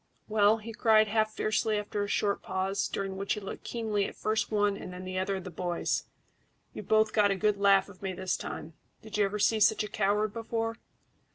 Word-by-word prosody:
Well," 215 0 +4
he 225 +1 -8
cried, 215 -1 +4
half 215 0 +1
fiercely, 215 0 +1
after 210 0 -2
a - - -3
short 200 0 0
pause, 190 +1 -1
during 195 -1 -4
which 195 0 -1
he - - -4
looked 195 - -7
keenly 215 -4 -1
at - - -9
first 215 +1 -1
one 205 -1 +2
and 185 - -8
then 180 +1 -8
the 185 0 -3
other 195 +1 -1
of 190 - -5
the 185 - -7
boys, 175 +1 -1 0.7
"you've - - -8
both 215 0 +3
got 210 -2 +5
the 215 +1 +4
laugh 200 -1 +4
of 200 -2 -15
me 195 -1 -2
this 185 0 -2
time. 160 - -6 0.3
Did 215 -1 -5
you 205 - +5
ever 200 +2 -2
see 215 +1 +2
such 215 +1 +4
a - - -4
coward 205 +1 0
before?" 225 0 -3
205 Hz, 215 wpm, -29 LUFS, 195-215 Hz, 0.7 s, got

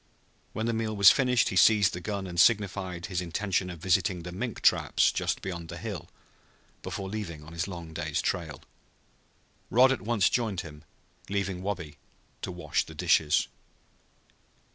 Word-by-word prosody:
When 110 - -2
the 115 - 0
meal 110 -1 -2
was 100 -1 +8
finished 125 -3 +2
he - - -4
seized 105 +2 +5
his 90 - -5
gun 100 0 -4
and 90 -2 -4
signified 95 -5 +2
his 90 -1 -2
intention 90 +1 -1
of 90 - -7
visiting 90 0 +1
the 90 - -7
mink 110 +5 -5
traps - - +3
just - - -2
beyond 85 -3 -5
the - - -6
hill - - -6 0.7
before 95 - -5
leaving 95 -7 -6
on 80 +2 -12
his 85 +2 -2
long 85 -4 -8
day's 80 -2 -2
trail. - - -3 1.1
Rod 130 +3 +5
at 130 - -1
once 105 -1 +2
joined 110 -7 0
him, 75 -2 -11 0.5
leaving 95 -2 -2
Wabi 85 -7 -5 0.4
to - - -4
wash - - -1
the - - -12
dishes. 75 -2 +2
95 Hz, 165 wpm, -28 LUFS, 85-105 Hz, 1.1 s, was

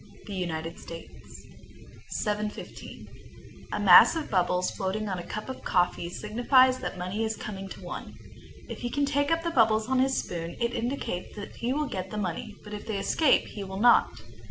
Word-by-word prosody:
United 170 -4 -4
States. 165 0 -11 0.6
715. 210 0 -4 0.6
A - - -2
mass - - +8
of 320 -2 -4
bubbles 180 -1 +1
floating 205 +2 -2
on 190 -2 -2
a - - -6
cup 215 +4 -6
of 260 - -6
coffee 175 -2 +1
signifies 255 +6 +3
that - - -5
money 185 +5 -2
is 220 0 -1
coming 195 -2 -6
to - - -10
one. - - -7 0.5
If - - -7
he 240 - -3
can 285 +3 +1
take 285 0 +1
up 330 0 +1
the 335 - -1
bubbles 220 -5 +3
on 260 0 +2
his 265 +1 +2
spoon, 170 -1 -4
it 235 0 0
indicates 235 -7 -3
that 205 -1 -8
he 240 +2 -1
will 300 +3 0
get 190 -8 -4
the 215 - -6
money, 200 +2 -3
but 210 - -9
if 210 - -7
they 215 -3 -2
escape 275 +8 +3
he 205 - -6
will 190 0 -6
not. 240 +2 +6
210 Hz, 185 wpm, -28 LUFS, 185-255 Hz, 0.6 s, mass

